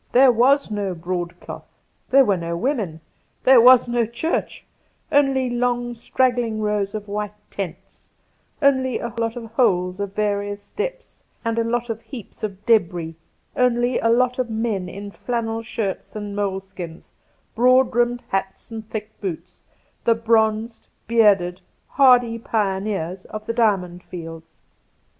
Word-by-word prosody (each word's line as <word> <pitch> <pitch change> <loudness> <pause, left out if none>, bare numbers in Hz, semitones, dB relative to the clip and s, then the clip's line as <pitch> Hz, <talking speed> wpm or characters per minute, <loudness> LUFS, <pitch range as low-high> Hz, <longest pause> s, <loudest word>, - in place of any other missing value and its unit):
There 260 +1 +7
was 255 +2 +3
no 200 -3 -2
broadcloth, 175 +1 -5 0.4
there 270 0 +6
were 200 - +3
no 170 -1 -3
women, 210 - -2 0.4
there 255 -2 +7
was 250 0 +7
no 240 -1 +1
church 235 +9 -3 0.2
— - - -42
only 270 -3 +3
long 245 0 -1
straggling 240 -1 0
rows 210 -1 -1
of 210 -1 -5
white 210 0 -4 0.2
tents, 190 -5 -7 0.5
only 260 -3 +3
a 235 -1 -5
lot 230 0 -1
of 240 -2 -6
holes 180 -6 +1
of 200 0 -4
various 205 -1 -2
depths - - -5 0.2
and 230 0 0
a - - +2
lot 235 +1 -1
of 225 0 -6
heaps 240 -7 -11
of 200 -1 -5
debris, 175 -7 +2 0.4
only 245 0 +2
a 230 - +1
lot 250 +2 +2
of 250 -2 0
men 220 -5 -2
in 200 +2 -8
flannel 225 0 -3
shirts 220 -4 -4
and 205 -1 -5
moleskins, 190 -4 -5 0.4
broad 255 +2 +4
brimmed 240 0 +1
hats 195 +3 -3
and 220 -1 -7
thick 215 0 -7
boots, 180 -2 -6 0.4
the 230 - +4
bronzed, 225 0 +1 0.2
bearded, 200 -6 +3 0.3
hardy 245 -4 +4
pioneers 195 -5 -2
of 215 0 -8
the 230 - -2
Diamond 195 -6 +1
Fields. 165 -2 -10
220 Hz, 145 wpm, -22 LUFS, 195-240 Hz, 0.5 s, There